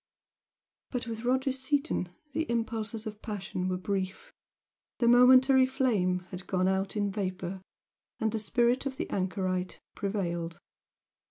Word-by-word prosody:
But 245 Hz, -3 st, -3 dB
with 225 Hz, 0 st, -5 dB
Roger 260 Hz, +2 st, +2 dB
Seaton 265 Hz, -, -1 dB, 0.2 s
the 320 Hz, +2 st, -1 dB
impulses 225 Hz, -1 st, -2 dB
of 215 Hz, -1 st, -7 dB
passion 190 Hz, -3 st, -3 dB
were 185 Hz, -, 0 dB
brief 190 Hz, -, -3 dB, 0.6 s
the 235 Hz, -, +2 dB
momentary 255 Hz, +2 st, +7 dB
flame 215 Hz, -9 st, +1 dB
had 180 Hz, 0 st, -7 dB
gone 185 Hz, -1 st, +1 dB
out 190 Hz, +1 st, 0 dB
in 205 Hz, -1 st, +1 dB
vapour, 190 Hz, -2 st, -3 dB, 0.6 s
and 220 Hz, -1 st, +1 dB
the 220 Hz, -, -1 dB
spirit 240 Hz, +5 st, +2 dB
of 265 Hz, -1 st, -5 dB
the 340 Hz, -, -2 dB
anchorite 185 Hz, -1 st, -1 dB
prevailed. 175 Hz, -5 st, -2 dB
215 Hz, 135 wpm, -30 LUFS, 185-250 Hz, 0.6 s, momentary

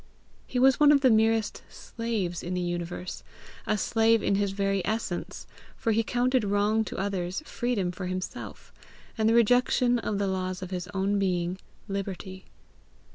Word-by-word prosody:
He 255 Hz, -, -4 dB
was 260 Hz, +1 st, +5 dB
one 295 Hz, -1 st, +7 dB
of 285 Hz, -2 st, +5 dB
the 260 Hz, -3 st, +5 dB
merest 220 Hz, -1 st, +2 dB
slaves 215 Hz, -7 st, -4 dB
in 180 Hz, +1 st, -4 dB
the 180 Hz, -, -1 dB
universe, 175 Hz, +1 st, -4 dB, 0.5 s
a 215 Hz, -, +2 dB
slave 225 Hz, +1 st, +2 dB
in -, -, +2 dB
his 200 Hz, 0 st, +1 dB
very 195 Hz, -1 st, 0 dB
essence, 215 Hz, -5 st, -3 dB, 0.3 s
for 225 Hz, -, 0 dB
he 220 Hz, +1 st, +3 dB
counted 250 Hz, +2 st, +1 dB
wrong 205 Hz, +2 st, +2 dB
to -, -, -6 dB
others 190 Hz, +2 st, -2 dB
freedom 235 Hz, -11 st, -1 dB
for 180 Hz, +1 st, -6 dB
himself, 185 Hz, 0 st, -6 dB, 0.4 s
and 220 Hz, -1 st, +2 dB
the 230 Hz, -, +3 dB
rejection 245 Hz, +1 st, +3 dB
of 210 Hz, -2 st, -2 dB
the 200 Hz, -, 0 dB
laws 185 Hz, -1 st, -2 dB
of 185 Hz, -, -7 dB
his 180 Hz, -1 st, -4 dB
own 200 Hz, +1 st, 0 dB
being, 180 Hz, -1 st, -1 dB, 0.3 s
liberty. 195 Hz, -1 st, -5 dB
200 Hz, 165 wpm, -27 LUFS, 185-225 Hz, 0.5 s, one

